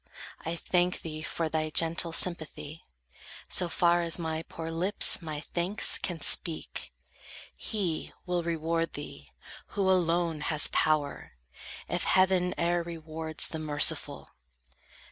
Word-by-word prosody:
I 165 +1 -3
thank 180 +1 0
thee 155 -1 -6
for 160 +1 -2
thy 155 0 -1
gentle 165 +2 +2
sympathy, 160 -2 -3 0.6
So 180 -2 0
far 175 0 +3
as 170 -1 +2
my 160 -2 -3
poor 165 0 -7
lips 180 +4 +3
my 155 -3 -5
thanks 180 +6 +1
can 175 -4 -4
speak. 160 +1 +1 0.6
He 190 -8 -3
will 180 -1 0
reward 165 0 -1
thee, - - -8 0.5
who 195 -2 +2
alone 170 -3 +2
has 155 -1 +1
power, 155 -2 0 0.5
If - - -2
heaven 185 -1 +3
e'er 175 0 +1
rewards 160 -1 -2
the 160 - -5
merciful." 150 -2 +1
165 Hz, 125 wpm, -29 LUFS, 160-175 Hz, 0.6 s, far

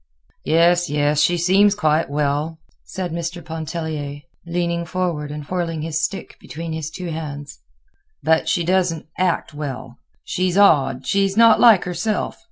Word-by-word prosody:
"Yes, 175 +2 +3
yes; 145 0 +1
she 175 +3 +3
seems 195 +4 +4
quite 155 -6 +1
well," 145 +2 -1 0.3
said 185 -2 -5
Mr. 170 +1 -5
Pontellier, 160 -3 -5 0.3
leaning 170 0 -1
forward 170 -4 -3
and 150 0 -7
whirling 165 -2 -3
his 160 0 -2
stick 190 +4 -4
between 165 +1 -7
his 160 -1 -4
two 170 +2 -6
hands; 145 -3 -7 0.6
"but 160 0 +2
she 175 -4 +1
doesn't 180 -2 0
act 180 -3 0
well. 135 -4 -7 0.2
She's 185 0 -1
odd, 135 -10 +4
she's 195 0 +1
not 230 -1 +6
like 225 -6 +6
herself. 180 +5 -2
165 Hz, 145 wpm, -21 LUFS, 150-180 Hz, 0.6 s, not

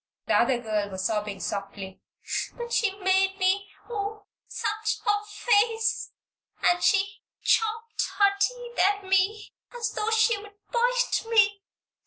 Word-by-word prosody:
The - - 0
other 250 -2 +3
child 210 -2 -1
was 190 0 -3
sobbing 210 -2 -1
softly. 195 -1 -5 0.6
"But 475 -1 -5
she 440 - +3
made 380 +1 +2
me, 395 +1 +1 0.2
oh, 420 -2 -4 0.2
such 430 +1 -2
a 415 0 +1
face! 440 +1 +1 0.5
And 355 0 +3
she 395 0 +2 0.2
chopped 450 0 +1 0.2
her 400 -1 +5
teeth 485 +2 -2
at 405 +1 +3
me 385 +3 +1 0.2
just 470 -2 -3
as - - -14
though 425 - -1
she'd 440 -2 +2 0.2
bite - - +2
me! 410 -3 +4
410 Hz, 135 wpm, -26 LUFS, 375-445 Hz, 0.6 s, her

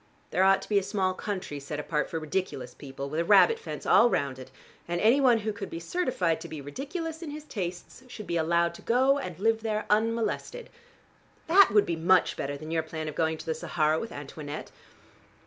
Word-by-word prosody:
There 185 - +1
ought 195 0 +4
to - - -10
be 205 -2 +4
a - - -4
small 190 -1 -1
county 185 -7 -5
set 145 +2 -6
apart 150 -1 -1
for 165 - -3
ridiculous 180 +5 -3
people, 140 -1 -7
with 155 +3 -3
a - - +2
rabbit 210 - +5
fence 455 - -7
all 240 - +6
round 135 - -1
it, 130 0 -10 0.4
and 175 0 -1
any 235 +8 +4
one 250 -3 +5
who 215 -1 -3
could 200 -1 -6
be 165 - -6
certified 180 - -1
to - - -7
be 155 - -7
ridiculous 315 - -5
in 330 - -6
his 300 +1 -7
tastes 185 - -6
should 215 -4 -9
be 170 - -3
allowed 170 +1 +2
to - - -12
go 265 +4 +3
and 180 - -6
live 225 +3 +1
there 215 -1 -2
unmolested. 230 - -1 0.7
That 380 +4 +6
would 210 -1 +4
be 170 - -1
much 175 +2 +3
better 140 +1 -4
than 155 +2 -8
your 165 -1 +1
plan 160 -1 -6
of 155 - -4
going 160 +1 0
to - - -10
the 160 - -1
Sahara 155 0 0
with 225 - -6
Antoinette. 145 +1 -7
185 Hz, 215 wpm, -28 LUFS, 160-230 Hz, 0.7 s, all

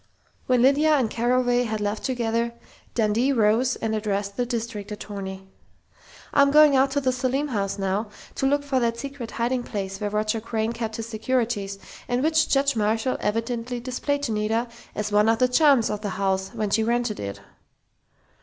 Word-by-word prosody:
When 250 -1 +3
Lydia 295 +3 +5
and 250 -6 +1
Carraway 245 +1 +2
had 220 -1 -2
left 210 +1 -2
together, 235 -2 -1 0.4
Dundee 230 +4 +2
rose 235 +1 +3
and 220 -1 -2
addressed 200 -2 -2
the 245 -1 -1
district 225 -3 -4
attorney: 195 -2 -6 0.9
"I'm 280 0 +5
going 300 0 +6
out 265 +1 +4
to 285 - +1
the 260 -1 +2
Selim 260 +3 -1
house 200 -5 -2
now, 200 +2 -1 0.2
to 270 - 0
look 285 +1 +1
for 275 -2 0
that 230 -1 0
secret 275 -2 -6
hiding 245 +2 -1
place 195 -4 -5
where 205 - -1
Roger 215 +1 -1
Crain 225 0 -2
kept 225 -2 -4
his 225 0 -5
securities, 220 -3 -1 0.3
and 245 +1 0
which 315 0 +3
Judge 275 -1 +2
Marshall 225 +4 0
evidently 230 +3 -2
displayed 275 +3 -2
to 235 - -1
Nita, 220 +3 0 0.3
as 210 0 -2
one 210 +1 +4
of 225 - +3
the 255 - +3
charms 265 -3 +4
of 210 0 -3
the 210 - -3
house 190 0 -1
when 215 -2 -3
she 225 - +3
'rented' 235 -1 0
it." 100 0 -5
230 Hz, 180 wpm, -24 LUFS, 210-255 Hz, 0.9 s, going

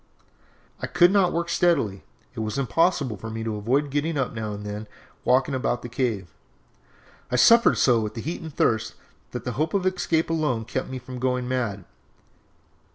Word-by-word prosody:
"I - - -2
could 175 +1 +5
not 195 -3 +3
work 170 +1 -1
steadily, 170 - +2 0.3
as - - -24
it - - -3
was 110 +3 -2
impossible 140 - +1
for 110 +4 -7
me 110 0 -4
to 110 -1 -2
avoid 130 +7 0
getting 150 +2 -1
up 135 -2 0
and - - -13
now 110 -1 -3
and 105 0 -6
then 105 +1 -5 0.4
walking 130 +2 +3
about 125 -2 -1
the 120 - -6
cave. 115 - -2 1.0
I - - +1
suffered 230 - +6
so 120 -3 +4
with 110 0 -4
the 115 - -4
heat 165 +7 -4
and 160 -2 -7
thirst, 110 -5 0 0.3
that - - -6
the - - -3
hope 155 +6 -1
of 190 -2 +1
escape 170 -3 +1
alone 150 -9 0
kept 130 - -3
me 130 - -4
from 125 0 -8
going 125 0 0
mad. 115 -7 -2
125 Hz, 195 wpm, -25 LUFS, 110-160 Hz, 1.0 s, suffered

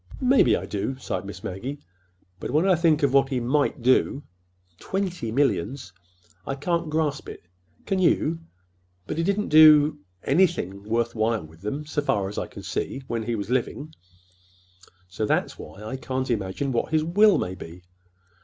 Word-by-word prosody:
"Maybe 255 +1 +5
I - - -5
do," 105 +6 -3
sighed 95 -7 -4
Miss 100 -1 -9
Maggie. 125 +10 -5 0.6
"But - - -5
when 155 +8 +2
I 190 - +5
think 160 -3 +2
of 140 -2 +2
what 135 -1 +4
he 130 -2 -1
might 135 +2 0
do—Twenty 110 - -2
millions! 135 -4 -1 0.5
I 135 - -2
can't 170 +3 -1
grasp 150 -2 -1
it. - - -10 0.4
Can 195 - 0
you? 165 -2 +2 0.7
But 150 - -4
he - - +1
didn't 200 +3 0
do—anything—worth 145 - +3
while 110 -2 0
with 80 +2 -17
them, 140 +9 -4
so 150 -1 -2
far 100 -8 0
as 100 - -4
I - - -4
can - - -11
see, 135 - -4
when 115 -2 -3
he 115 +1 -2
was 100 +1 -5
living, 140 +4 -2 1.1
so 90 +4 -3
that's - - -1
why 95 +7 -10
I 110 +5 -5
can't 130 0 -3
imagine 110 +5 -2
what 120 +5 -1
his 155 -1 +2
will 205 +5 +4
may 90 - -2
be. 90 -1 -11
130 Hz, 165 wpm, -25 LUFS, 105-155 Hz, 1.1 s, Maybe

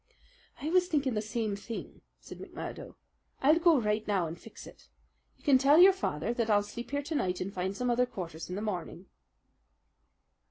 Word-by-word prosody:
"I 305 +3 -3
was 360 0 +4
thinking 285 -7 0
the 210 - 0
same 220 -1 -2
thing," 215 +3 -8 0.2
said - - -11
McMurdo. - - -8 0.4
"I'll 305 +5 +4
go 335 -4 +5
right 210 -1 -1
now 195 -4 +1
and 160 +1 -5
fix 220 +6 -13
it. - - -15 0.5
You - - -27
can 275 -3 +5
tell 280 +3 +5
your 375 +3 +8
father 235 - -2
that 230 -2 -1
I'll 205 -1 +4
sleep 235 +3 -8
here 285 0 -2
to 310 - -5
night 185 -11 -1
and 195 +2 -4
find 190 +1 -3
some 250 -1 0
other 250 +1 +2
quarters 170 -9 -7
in 180 - -4
the 205 - -4
morning." 180 -3 -5
225 Hz, 195 wpm, -30 LUFS, 200-285 Hz, 0.5 s, your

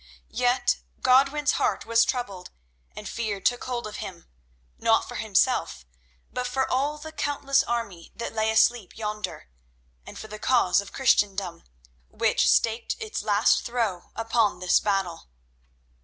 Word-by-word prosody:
Yet 250 +1 +2 0.3
Godwin's 275 +3 +4
heart - - 0
was 230 0 +4
troubled 200 -9 -4 0.5
and - - -7
fear 215 -4 -3
took 245 +4 0
hold 245 -2 -3
of 215 - -7
him, 185 -6 -8 0.5
not - - +2
for - - -8
himself, 65 - 0 0.5
but 250 0 -2
for 265 +1 0
all 285 +4 0
the 315 +1 -9
countless 285 -2 +1
army 230 -10 -4
that 235 - -5
lay 220 0 +1
asleep 220 -2 +2
yonder, 210 - -5 0.6
and - - -11
for 220 - -8
the 215 0 -9
cause 210 -7 +3
of 200 - -11
Christendom, 200 - +1 0.4
which - - +2
staked 225 0 +1
its 440 -1 -4
last 210 +1 +3
throw 230 -7 -2
upon 225 -3 +1
this 180 0 +3
battle. 195 - -2
230 Hz, 140 wpm, -26 LUFS, 200-255 Hz, 0.6 s, Godwin's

